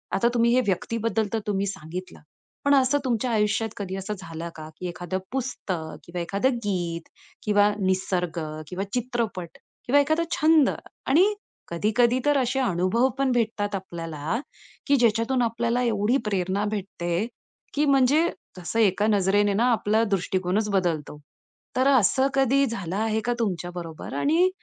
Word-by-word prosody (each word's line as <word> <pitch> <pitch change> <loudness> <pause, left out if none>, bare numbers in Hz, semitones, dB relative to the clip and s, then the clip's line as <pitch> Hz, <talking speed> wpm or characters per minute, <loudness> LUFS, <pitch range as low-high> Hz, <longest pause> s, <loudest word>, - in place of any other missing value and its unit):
आता 235 - +3
तुम्ही 235 0 +4
हे 255 - +4
व्यक्तीबद्दल 220 +3 0
तर 225 - +1
तुम्ही 200 -1 0
सांगितलं. 185 -1 -7 0.5
पण 285 0 +5
असं 265 +1 +3
तुमच्या 245 0 0
आयुष्यात 220 0 +1
कधी 190 -2 -4
असं 195 +2 -4
झालं 165 -2 -6
का? 155 -1 -8
की 180 - -4
एखादं 175 +2 -4
पुस्तक 205 -11 -3
किंवा 175 0 -5
एखादं 200 +9 0
गीत 175 -4 -2 0.4
किंवा 205 0 +4
निसर्ग 185 -3 0 0.3
किंवा 185 +2 -3
चित्रपट 235 -8 -3 0.3
किंवा 280 +4 +4
एखादा 315 +4 +1
छंद 310 -2 +4 0.4
आणि 365 +10 +5 0.3
कधी-कधी 225 +8 +2
तर 290 -1 +4
असे 265 0 +1
अनुभव 210 +1 +2
पण 270 -1 +1
भेटतात 215 -4 0
आपल्याला, 165 0 -4 0.5
की 285 - +5
ज्याच्या 230 -3 +3
तून 260 -2 +2
आपल्याला 235 +1 0
एवढी 225 +1 +2
प्रेरणा 195 -1 0
भेटते, 185 -1 -2 0.5
की 295 +1 +2
म्हणजे 280 +4 +4 0.3
जसं 180 +5 -3
एका 210 -1 +3
नजरेने 205 0 +3
ना 225 +5 +2
आपला 220 -1 +2
दृष्टिकोनच 190 +2 0
बदलतो. 170 -7 -1 0.6
तर 260 +1 +3
असं 260 0 +4
कधी 275 +1 +3
झालं 195 -8 -4
आहे 220 +1 0
का 240 - +1
तुमच्या 180 -5 -2
बरोबर? 165 -5 -7
आणि 320 - +3
210 Hz, 150 wpm, -25 LUFS, 185-245 Hz, 0.6 s, पण